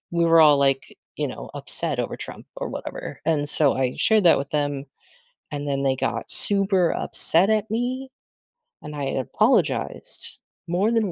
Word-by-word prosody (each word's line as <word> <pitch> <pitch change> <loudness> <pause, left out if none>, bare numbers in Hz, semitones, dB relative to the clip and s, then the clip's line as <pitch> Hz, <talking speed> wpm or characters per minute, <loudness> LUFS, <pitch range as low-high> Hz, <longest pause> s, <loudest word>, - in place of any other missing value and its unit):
we 170 0 0
were 165 0 +4
all, 150 -2 +5
like, 135 -1 0 0.2
you - - -2
know, - - -9
upset - - 0
over - - -3
Trump - - -9
or - - -5
whatever, - - -8
and 150 -2 0
so 145 -1 +5
I 130 -1 -2
shared 215 -3 +2
that 170 - +6
with 140 0 -6
them, 145 -2 -2 0.7
and 145 -1 -5
then 140 0 -2
they 135 -1 +1
got - - -4
super 195 -3 +4
upset 180 +6 +2
at 215 0 -1
me, 255 +3 -3 0.7
and 150 - -9
I 145 - -5
had 135 - -3
apologized 130 - 0 0.3
more 190 +6 0
than 220 -5 0
165 Hz, 175 wpm, -22 LUFS, 140-200 Hz, 0.7 s, that